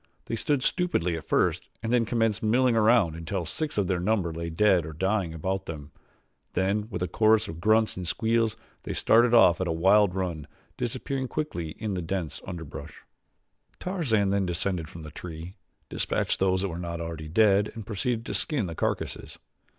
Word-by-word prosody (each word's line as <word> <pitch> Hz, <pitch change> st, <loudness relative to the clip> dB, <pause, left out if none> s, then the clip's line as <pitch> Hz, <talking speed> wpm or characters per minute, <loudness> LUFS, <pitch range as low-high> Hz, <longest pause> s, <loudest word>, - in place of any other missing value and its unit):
They -, -, -3 dB
stood 135 Hz, +4 st, 0 dB
stupidly 155 Hz, -, +1 dB
at 80 Hz, -, -7 dB
first -, -, +1 dB
and 115 Hz, -, -1 dB
then 120 Hz, -2 st, +3 dB
commenced 115 Hz, -1 st, 0 dB
milling 120 Hz, +2 st, +3 dB
around 110 Hz, -7 st, +4 dB
until 85 Hz, +2 st, -3 dB
six 155 Hz, -, -3 dB
of 100 Hz, -, +2 dB
their 90 Hz, -1 st, 0 dB
number 90 Hz, -3 st, 0 dB
lay 85 Hz, +1 st, -4 dB
dead 95 Hz, +1 st, +3 dB
or 80 Hz, 0 st, -7 dB
dying 95 Hz, +2 st, 0 dB
about 95 Hz, +5 st, -3 dB
them; 75 Hz, -2 st, -7 dB, 0.6 s
then 100 Hz, +3 st, 0 dB
with 90 Hz, -5 st, -3 dB
a -, -, 0 dB
chorus 110 Hz, +1 st, +3 dB
of 80 Hz, +1 st, -7 dB
grunts 110 Hz, +3 st, +3 dB
and 90 Hz, -2 st, -4 dB
squeals 115 Hz, +2 st, +1 dB, 0.2 s
they -, -, -5 dB
started 120 Hz, +1 st, +4 dB
off 90 Hz, -6 st, +6 dB
at 95 Hz, -, 0 dB
a -, -, 0 dB
wild 95 Hz, +3 st, +4 dB
run, 85 Hz, -5 st, -3 dB, 0.3 s
disappearing 130 Hz, +2 st, -3 dB
quickly 85 Hz, -, -4 dB
in 105 Hz, -2 st, -3 dB
the 90 Hz, -, -2 dB
dense 85 Hz, -1 st, -4 dB
underbrush. 85 Hz, -5 st, -8 dB, 0.8 s
Tarzan 125 Hz, -, 0 dB
then 100 Hz, -2 st, +1 dB
descended 85 Hz, -2 st, -1 dB
from 85 Hz, -, -10 dB
the 75 Hz, -, -9 dB
tree, 85 Hz, +2 st, -8 dB, 0.3 s
dispatched -, -, -1 dB
those 95 Hz, 0 st, +2 dB
that 100 Hz, -, -1 dB
were 85 Hz, 0 st, -5 dB
not 85 Hz, -1 st, -4 dB
already 80 Hz, -2 st, -5 dB
dead 100 Hz, +3 st, +3 dB
and 110 Hz, -3 st, -7 dB
proceeded 115 Hz, +3 st, -2 dB
to -, -, -4 dB
skin 140 Hz, -9 st, 0 dB
the 85 Hz, -, -5 dB
carcasses. -, -, -3 dB
95 Hz, 185 wpm, -27 LUFS, 85-115 Hz, 0.8 s, off